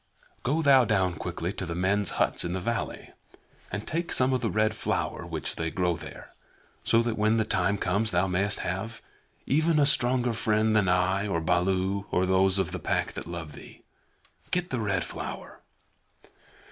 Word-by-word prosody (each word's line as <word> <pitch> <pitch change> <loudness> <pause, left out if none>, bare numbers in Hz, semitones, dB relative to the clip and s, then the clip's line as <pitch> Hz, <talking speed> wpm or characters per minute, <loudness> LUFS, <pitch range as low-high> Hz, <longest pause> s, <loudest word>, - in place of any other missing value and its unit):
"Go 155 +6 0
thou 135 -3 +6
down 95 -6 +1
quickly 85 +2 -4
to - - -5
the 85 - -4
men's 95 +3 +1
huts - - +2
in 85 - -2
the 95 - -2
valley, 115 +3 -3 0.6
and 100 +3 -4
take 170 +2 -3
some 130 +1 +2
of 130 - 0
the 115 - 0
Red 110 +1 +1
Flower - - -2
which - - -3
they 80 0 -1
grow 90 0 0
there, - - -10 0.5
so 115 +1 +3
that 115 -2 -2
when 110 +1 +3
the 110 - +1
time 95 +2 +1
comes 100 +4 0
thou 90 -1 +2
mayest 95 +2 0
have 95 +6 -4 0.4
even 160 +3 +2
a 145 - +5
stronger 125 -3 +2
friend 110 0 +1
than 100 -3 +3
I 90 +3 +2
or 90 -5 0
Baloo 95 +4 0
or 90 - +1
those 95 +1 +3
of 95 -4 0
the - - -4
Pack - - -1
that - - -7
love 85 -3 -6
thee. - - -13 0.7
Get 180 0 -1
the 130 - -1
Red 100 -4 0
Flower." - - -7
100 Hz, 185 wpm, -27 LUFS, 90-115 Hz, 0.7 s, thou